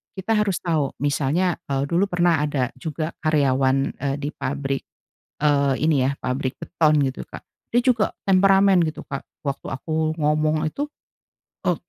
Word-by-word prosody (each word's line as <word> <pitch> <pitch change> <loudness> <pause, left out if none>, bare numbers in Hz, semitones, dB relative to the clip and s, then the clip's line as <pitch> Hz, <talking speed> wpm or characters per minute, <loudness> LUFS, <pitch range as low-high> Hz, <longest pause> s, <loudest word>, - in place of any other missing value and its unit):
kita 190 +3 -3
harus 210 -5 +1
tau 155 -6 0
misalnya, 150 +5 +1
eee, 135 -1 0
dulu 175 +6 +2
pernah 175 -3 +2
ada 145 -4 -1
juga 155 +2 -3
karyawan, 135 -3 +2
eee, 140 -1 -1
di 145 +1 -4
pabrik, 135 -1 -3 0.6
eee, 140 -2 +3
ini 150 -4 +3
ya, 135 - +1
pabrik 130 +1 -2
beton 155 -3 +2
gitu 135 -1 -2
Kak, - - -10 0.3
dia 240 - +4
juga 240 -5 +2 0.2
temperamen 195 0 +5
gitu 155 - -4
Kak 140 -1 -5 0.2
waktu 140 -2 -4
aku 155 +3 -1
ngomong 155 +1 +1
itu, 285 - -3 0.8
e - - +3
150 Hz, 150 wpm, -23 LUFS, 140-175 Hz, 0.8 s, temperamen